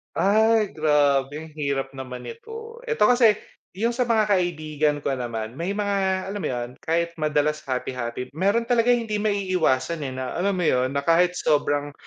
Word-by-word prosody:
Ay, 220 +1 +3
grabe, 145 -3 +2
ang 160 - -12
hirap 135 -2 -1
naman 130 -2 -8
nito. 455 - -9
Eto 460 0 +1
kasi, 240 -4 +5 0.4
yung 230 +5 0
sa 245 0 -1
mga 220 -3 +2
kaibigan 155 -5 0
ko - - 0
naman 115 -4 -3
may 185 +4 -2
mga 205 -1 0 0.4
alam 205 - -4
mo - - -2
yon, 120 -1 -3
kahit 170 +1 0
madalas 150 0 +1
happy-happy, 125 -1 -4
meron 200 +9 +1
talaga 235 0 +2
hindi 225 -3 -2
maiiwasan, 185 -8 0
eh, 130 - -6
na 130 -1 -4
alam 195 +1 +1
mo 180 - -1
yun, 130 -3 +1
na 140 - 0
kahit 175 +2 +3
sobrang 145 -3 +1
160 Hz, 170 wpm, -24 LUFS, 135-205 Hz, 0.4 s, kasi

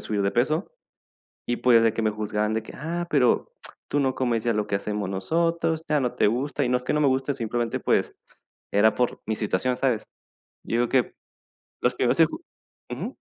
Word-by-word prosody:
subir 105 -2 -2
de 100 0 +1
peso. 155 +9 0 0.8
Y 120 - -1
pues, 120 -2 +5
de 115 - +4
que 115 - -2
me 110 -1 +1
juzgaran 105 0 -1
de 110 - -1
que: - - -10
"Ah, 170 +4 -3
pero 130 -5 +2 0.4
tú 145 - +1
no 130 -2 +1
comes 120 -3 0
ya 115 - +2
lo 105 0 -1
que 100 - -1
hacemos 105 -1 -2
nosotros, 165 - 0
ya 150 -1 +3
no 125 -2 -1
te - - +3
gusta", 130 +6 -1
y 125 - 0
no 125 - +3
es 125 - -10
que - - 0
no 150 - +2
me 140 - +4
guste, 135 +2 0
simplemente, 120 -1 -2
pues, - - +1 0.6
era 105 +2 +4
por 125 -1 -1
mi 110 - 0
situación, 110 +4 -1
¿sabes? 125 -5 0 0.6
Yo 115 - -2
digo 120 - +2
que 130 -1 +1 0.7
los - - +1
primeros - - +1
en - - +7
ju - - -9 0.5
ujú. - - -5
120 Hz, 210 wpm, -25 LUFS, 110-135 Hz, 0.8 s, en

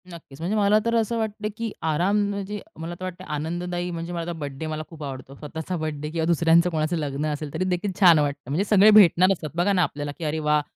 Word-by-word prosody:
नक्कीच. 160 -5 -12
म्हणजे 185 +6 -1
मला 205 0 +4
तर 230 0 +1
असं 230 0 +1
वाटत 215 -1 -3
की 230 -2 -3 0.2
आराम 180 +7 +2
म्हणजे 200 +1 -4 0.2
मला 165 +2 -5
तर - - -8
वाटतं 185 -1 -6
आनंददायी 175 +3 -3
म्हणजे 170 +1 -5
माझा 170 0 -3
बर्थडे 145 -1 -6
मला 155 0 -4
खूप 160 -3 -10
आवडतो. 135 -1 -7
स्वतःचा 160 +5 -5
बर्थडे 150 -2 -4
किंवा 160 -1 -1
दुसऱ्यांचं 170 +1 +4
कोणाचं 160 +1 -1
लग्न 145 -1 -2
असेल 145 -1 -6
तरीदेखील 185 +2 -1
छान 175 -5 +7
वाटतं. 145 -2 -2
म्हणजे 155 +8 +1
सगळे 210 0 +7
भेटणार 185 -3 +6
असतात 160 -4 -6
बघा 180 +4 +2
ना 180 -2 +3
आपल्याला, 145 -2 -3
की - - -8
अरे 155 +1 -1
वाह! 150 0 +2
170 Hz, 220 wpm, -24 LUFS, 150-185 Hz, 0.2 s, छान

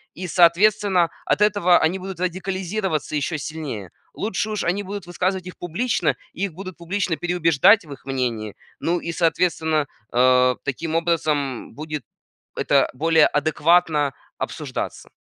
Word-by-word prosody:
и, 185 - -6
соответственно, 180 +1 +4 0.2
от - - +1
этого 205 -4 +4
они 170 +4 +1
будут 190 -1 -7
радикализироваться 185 -2 -2
еще 150 +2 -1
сильнее. 145 - -6 0.2
Лучше 215 0 -2
уж 215 -2 -2
они 180 +4 0
будут 200 -1 -6
высказывать 185 +1 -2
их 180 - -9
публично, 175 0 0 0.2
и 195 - -1
их 190 - -6
будут 185 +1 -8
публично 175 0 -2
переубеждать 175 +3 +4
в 150 - -13
их 135 - -15
мнении, 120 -6 -2 0.2
ну 175 +1 0
и, 170 - -4
соответственно, 160 -2 +1 0.3
а, 125 +1 +4
таким 155 +4 -3
образом 155 -6 -1
будет 150 -2 -5 0.5
это - - +2
более 160 +3 +4
адекватно 155 -1 +2 0.2
обсуждаться. - - -5
170 Hz, 140 wpm, -22 LUFS, 150-185 Hz, 0.5 s, соответственно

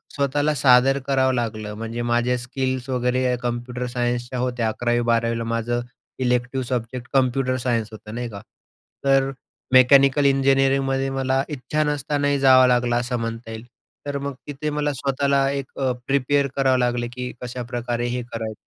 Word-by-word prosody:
स्वतःला 145 +2 +1
सादर 130 +1 +5
करावं 130 -1 +2
लागलं. 110 -3 -3
म्हणजे 115 +1 -4
माझ्या 120 +1 +1
स्किल्स 130 +1 -3
वगैरे 125 0 +1
कम्प्युटर 120 +1 -3
सायन्सच्या 120 0 -2
होत्या. 120 -2 -1
11वी-12वीला 115 0 0
माझं 115 +1 -1 0.4
इलेक्टिव्ह 125 +1 0
सब्जेक्ट 125 0 -3
कम्प्युटर 130 -1 +2
सायन्स 120 -3 -1
होतं 110 0 -10
नाही 120 -1 -4
का, 100 -2 -9 0.6
तर 135 0 +3 0.4
मेकॅनिकल 140 +2 +6
इंजिनिअरिंगमध्ये 135 0 +2
मला 135 0 0
इच्छा 150 +2 -2
नसतानाही 145 -1 0
जावं 130 -1 +6
लागलं 120 -1 +2
असं 125 0 -1
म्हणता 115 0 -5
येईल. 110 +1 -8 0.4
तर 140 -1 -2
मग 140 0 -4
तिथे 145 +1 -4
मला 150 0 -1
स्वतःला 135 +1 +1
एक 140 -1 -5
अ, 130 -1 +1 0.2
प्रिपेअर 140 +1 +2
करावं 135 -2 +3
लागलं, 120 -1 0
की 125 0 -5
कशाप्रकारे 120 -1 -3
हे 125 +1 -2
करायचं. 110 -1 -4
125 Hz, 145 wpm, -22 LUFS, 120-135 Hz, 0.6 s, मेकॅनिकल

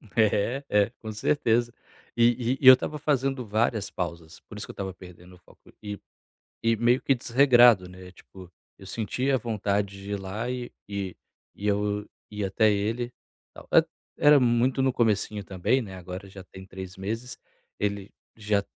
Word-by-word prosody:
É, 115 +4 +2
é 105 0 +3
com 110 -1 -6
certeza. 120 0 +1 0.4
E 120 +1 +2
e - - -16
e 130 - +3
eu 130 - +13
estava 150 +4 -1
fazendo 135 -3 0
várias 110 0 0
pausas, 85 -3 -6
por - - -12
isso - - -6
que - - -7
eu - - -15
estava 95 -1 -5
perdendo 90 0 -14
o - - -18
foco 85 - -22
e 105 -2 -6 0.6
e 115 0 +2
meio 120 +3 +3
que 135 - +2
desregrado, 120 -5 +5
né, 90 0 -12
tipo, 95 0 -15 0.3
eu 95 - -14
sentia 125 +6 -1
vontade 105 -3 -2
de 100 - -8
ir 100 - -2
lá 105 +6 -4
e 125 -1 -5 0.2
e 100 -2 -5 0.4
eu 105 0 -1 0.2
ia 105 -2 -3
até 110 +2 +3
ele 115 +4 -1 1.1
Era 145 0 +7
muito 125 +2 +2
no 130 0 +2
comecinho 105 -3 0
também, 100 +8 0
né, 95 -4 -9
agora 90 +2 -8
já 95 -1 -11
tem 95 0 -13
3 95 0 -9
meses 115 +6 -5 0.4
ele 100 -1 -2 0.3
já 105 -2 0
105 Hz, 165 wpm, -26 LUFS, 95-120 Hz, 1.1 s, eu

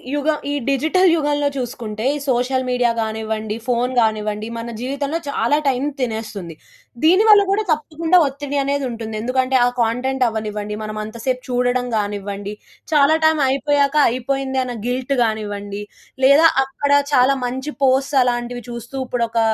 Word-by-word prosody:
యుగం 300 +1 +1
ఈ - - -1 0.2
డిజిటల్ 315 +7 +2
యుగంలో 290 -2 0
చూసుకుంటే, 230 -4 -5
ఈ - - -2
సోషల్ 255 +1 +1
మీడియా 245 -1 +2
గానివ్వండి, 220 -1 -3
ఫోను 250 +1 0
గానివ్వండి, 215 0 -1
మన 230 +1 -5
జీవితంలో 280 +4 -2
చాలా 280 +1 +1
టైం 260 0 +1 0.2
తినేస్తుంది. 220 -8 -4 0.5
దీనివల్ల 405 +5 +6
కూడా 425 +2 +1
తప్పకుండా 320 +3 +1
ఒత్తిడి 280 +1 -4
అనేదుంటుంది. 245 -6 -3
ఎందుకంటే 255 +2 0
ఆ - - +4
కంటెంట్ 250 +3 0
అవ్వనివ్వండి, 210 -2 -4
మనం 215 0 -5
అంత 220 +2 -10
సేపు 255 -1 0
చూడడం 245 0 +1
గానివ్వండి, 205 -1 -4 0.4
చాలా 295 +1 +5
టైం 315 -1 +4
అయిపోయాక 280 +1 +1
అయిపోయింది 265 +2 -2
అన్న 250 -1 -5
గిల్ట్ 255 +2 -1
గానివ్వండి 205 -2 -3 0.4
లేదా 285 +5 +7 0.2
అక్కడ 275 +1 -3 0.2
చాలా 255 +1 +5
మంచి 260 +4 -4
పోస్ట్స్ 270 +2 +2
అలాంటివి 245 0 -2
చూస్తూ 235 +2 -8
ఇప్పుడు 245 -2 -1
ఒక 230 - 0
250 Hz, 140 wpm, -20 LUFS, 220-280 Hz, 0.5 s, లేదా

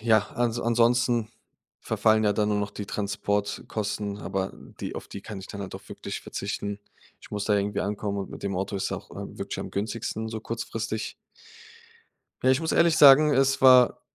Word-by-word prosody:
Ja, 110 -1 +5 0.2
an 120 -1 +1
ansonsten 120 0 +2 0.5
verfallen 110 0 +2
ja 105 - +3
dann 105 +1 +1
nur 105 - +1
noch 100 -1 -2
die 100 0 -7
Transportkosten, 100 0 -2
aber 95 -2 -3 0.3
die - - -4
auf - - -7
die 100 - -8
kann 105 - -7
ich 95 - -9
dann 100 0 -7
halt 95 - -7
auch - - -10
wirklich - - -6
verzichten. 100 0 -4 0.4
Ich - - -15
muss 105 -1 -3
da 105 - +2
irgendwie 100 +1 -1
ankommen 100 0 -2
und 100 - -5
mit - - -9
dem 100 -2 -2
Auto 95 +2 -2
ist 95 - -2
auch, - - -6
ähm, - - -8
wirklich - - -4
am - - -5
günstigsten, 110 +1 -3
so 110 0 -5
kurzfristig. 115 -1 -4 1.3
Ja, 130 - +5
ich 130 +3 +3
muss 160 - -1
ehrlich 170 -1 +4
sagen, 145 +2 +8
es 135 0 +3
war, 130 -2 +7
105 Hz, 190 wpm, -26 LUFS, 100-120 Hz, 1.3 s, sagen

